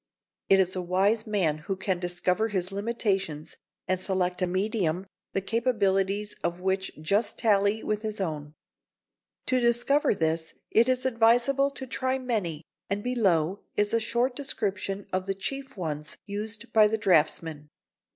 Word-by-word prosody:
It 195 - +6
is 185 0 +2
a 185 - -1
wise 195 +5 +1
man 175 -8 +1
who 180 +6 -3
can 190 -1 -1
discover 180 +4 0
his 190 -3 -2
limitations 195 -7 -2 0.3
and 185 -1 +1
select 185 -1 -1
a 180 - +2
medium 185 -2 0 0.3
the 195 - 0
capacities 205 -3 +1
of 175 +1 -1
which 190 +1 -1
just 205 +8 0
tally 205 -1 +2
with 215 0 -1
his 215 -1 -1
own. 155 -5 -4 0.9
To 255 - +2
discover 240 +3 +3
this, 160 -1 -1 0.2
it 230 +3 +4
is 255 0 +1
advisable 245 +3 +3
to 275 -1 -7
try 260 +1 -1
many, 205 - -2 0.3
and 205 +1 -1
below 195 -7 +1 0.2
is 205 +1 +1
a 230 - +4
short 240 +3 0
description 200 -7 -2
of 185 0 -1
the 195 - -1
chief 270 +6 -5
ones 150 -4 -4
used 215 +3 -5
by 215 -1 +7
the 220 +1 0
draughtsman. 160 -5 +1
200 Hz, 150 wpm, -27 LUFS, 180-230 Hz, 0.9 s, by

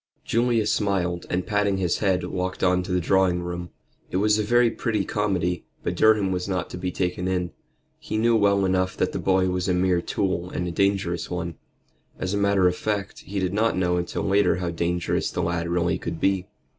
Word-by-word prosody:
Julius 115 -2 +2
smiled 90 -4 -1
and 90 0 -1
patting 105 -2 +1
his 90 -3 0
head, 95 -3 +1
walked 95 0 -3
on 90 -1 +3
to 90 - -6
the 90 - +2
drawing 90 0 +2
room. 85 0 -5 0.4
It - - -1
was 105 +2 +3
a - - +1
very 120 +2 +3
pretty 110 -1 -1
comedy, 90 -4 -1 0.2
but 85 - -1
Durham 105 0 +3
was 90 0 -2
not 90 -3 -2
to - - -5
be 90 0 -2
taken 90 0 -2
in. 90 -2 -1 0.5
He 110 - -4
knew 115 +1 +3
well 100 -2 +3
enough 95 0 0
that - - 0
the - - -3
boy 95 -1 +2
was 90 +1 -1
a 90 - +2
mere 90 -1 +2
tool 90 -1 -2
and 90 - -3
a - - -2
dangerous 95 -2 0
one. 85 -1 -3 0.6
As 95 +1 -3
a - - +1
matter 100 -2 +3
of 90 - +1
fact, 100 -1 -3
he 100 - -5
did 95 -1 0
not 110 0 +1
know 90 -1 +1
until 85 0 -2
later 100 +1 +3
how 90 -1 -2
dangerous 85 +1 -1
the 90 - -2
lad 85 0 -1
really 85 +1 0
could 85 -1 -5
be. 95 -1 +1
95 Hz, 210 wpm, -24 LUFS, 90-100 Hz, 0.6 s, on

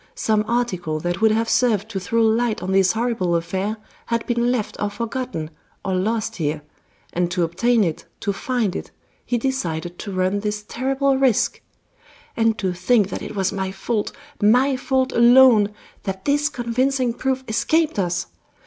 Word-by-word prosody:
Some 215 -1 +1
article 185 -10 -1
that 175 +3 -2
would 220 - +6
have 225 +1 +1
served 220 -4 +2
to 200 -4 -3
throw 230 +5 +1
light 225 -1 +1
on 185 - -2
this 190 -1 +4
horrible 225 -7 0
affair 190 +6 -2 0.3
had 230 -1 -1
been 240 0 +1
left 235 -5 -2
or 205 - +1
forgotten, 230 - -4 0.3
or 190 - 0
lost 220 +4 -1
here, 150 -2 -2 0.5
and 175 0 0
to 180 0 0
obtain 215 +8 +2
it, 165 -4 -3 0.2
to 200 - -1
find 225 -3 -1
it, - - -5 0.3
he 245 - -1
decided 175 -10 -3
to 200 - -5
run 185 +2 0
this 210 0 -3
terrible 270 +2 0
risk. 260 -6 +2 0.7
And 225 -1 +2
to 185 -2 -1
think 200 +3 +2
that - - -5
it - - -7
was 190 -1 0
my 190 -1 -2
fault, 205 +3 -2 0.3
my 250 +6 +4
fault 260 0 0
alone, 235 -3 +6 0.3
that 190 -1 -5
this 290 +1 +2
convincing 250 0 0
proof 265 +1 -1
escaped 310 +4 +1
us! 175 -2 0
220 Hz, 165 wpm, -22 LUFS, 190-245 Hz, 0.7 s, would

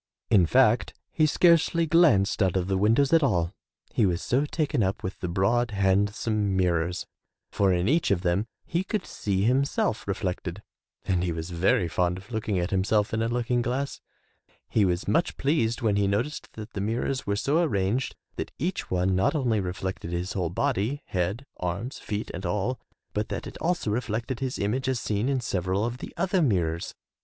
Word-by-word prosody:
In 90 -5 +5
fact, - - +3 0.2
he 155 - +3
scarcely 170 +1 +4
glanced 150 - +4
out 95 -1 +2
of 90 -1 -1
the 95 - 0
windows 115 +9 +3
at 165 - +6
all, 90 - +1 0.4
he - - +2
was 85 -1 0
so 135 +4 +1
taken 150 -3 0
up 95 -1 -1
with 95 - -5
the 90 - -3
broad, 105 +7 +1
handsome 100 +1 +1
mirrors, 90 -1 0 0.5
for 100 -2 +2
in 90 +1 +1
each 160 +5 +2
of 95 -3 +2
them 90 +4 0 0.2
he 170 +2 -1
could 200 0 -2
see 100 -2 -1
himself 130 -2 +1
reflected 95 -1 -3 0.4
and 90 -2 +1
he 90 - 0
was 80 +2 -5
very 85 0 +2
fond 90 +3 0
of 100 +6 -13
looking 110 -3 -1
at 90 +1 -1
himself 100 +2 +1
in 110 - +1
a 115 - +1
looking 120 +1 0
glass. 130 +4 -2 0.7
He 105 - +2
was 90 0 -1
much 165 +2 +1
pleased 130 -5 +1
when 105 -3 +2
he 100 -1 +2
noticed 115 +10 -2
that 110 0 -9
the 100 - -3
mirrors 115 +5 -2
were 100 - +1
so 145 +10 +2
arranged 115 - 0 0.2
that - - -3
each 180 +7 -2
one 90 +1 +1
not 95 - +2
only 120 -7 +1
reflected 90 -2 -4
his 85 +2 -2
whole 90 -4 -1
body, 130 - -1
head, 95 +8 -2
arms, 90 +9 -4
feet 105 +1 -4
and 95 - -6
all, 105 +7 -1 0.3
but 105 +1 -2
that - - -4
it - - -8
also 175 -10 0
reflected 115 +2 -2
his 130 -2 -2
image 125 +6 -1
as 130 -2 0
seen 105 +4 -1
in 135 -2 +1
several 95 -1 -1
of 120 +1 -4
the - - -7
other 185 +1 +1
mirrors. 85 - 0
105 Hz, 190 wpm, -27 LUFS, 95-130 Hz, 0.7 s, at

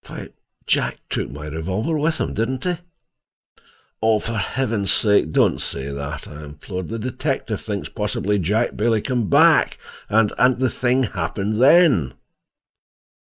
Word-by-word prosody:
"Why, - - -8 0.4
Jack - - 0
took - - -2
my 75 +3 -8
revolver 95 - -2
with 155 +2 0
him, - - -2
didn't 125 +4 -2
he?" 180 -2 -1 1.2
"Oh, 110 0 +3
for 115 +2 -4
Heaven's 110 -4 -1
sake 105 -7 +3
don't - - +2
say 70 0 -3
that," 70 +2 -6
I 75 +1 -10
implored. 80 +5 -7
"The 115 - -4
detective 120 +2 -3
thinks - - -4
possibly 105 +1 -1
Jack 105 +7 0
Bailey 110 0 +1
came 120 -5 -1
back, - - +4 0.3
and—and 115 +3 +3
the 130 0 0
thing 130 +1 +1
happened 100 +3 -2
then." 135 - +5
110 Hz, 140 wpm, -21 LUFS, 90-125 Hz, 1.2 s, then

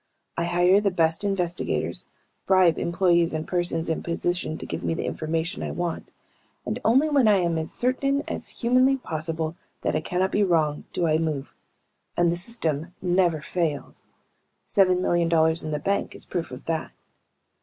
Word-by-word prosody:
I 170 - -1
hire 175 +3 +4
the 205 - +2
best 165 -1 +1
investigators, 180 -3 -1 0.4
bribe 185 -4 +4
employees 170 -2 +2
and 155 0 -3
persons 175 -2 +1
in 160 - -1
position 170 -1 -2
to - - -7
give - - -5
me 165 - 0
the - - -3
information 165 +3 -2
I - - -3
want, 175 -1 -4 0.5
and - - -3
only 265 +7 +4
when 280 -6 +3
I 210 - +6
am 170 -3 +1
as 160 - -4
certain 275 +3 0
as - - -3 0.2
humanly 255 +3 +4
possible 160 -5 -3 0.3
that - - 0
I - - +1
cannot 185 +1 -1
be 205 - +2
wrong 155 -5 +1
do 175 - 0
I 155 -1 +2
move. 150 -4 -3 0.6
And 175 -1 +3
the - - 0
system 170 -5 -2
never 175 -3 +2
fails. 160 -3 -3 0.6
Seven 185 -2 +3
million 175 -2 +2
dollars 160 0 +3
in 155 - -4
the 150 - -1
bank 200 +7 -1
is - - -5
proof 175 -2 -3
of 125 0 -10
that. 160 -1 -3
175 Hz, 175 wpm, -25 LUFS, 160-190 Hz, 0.6 s, I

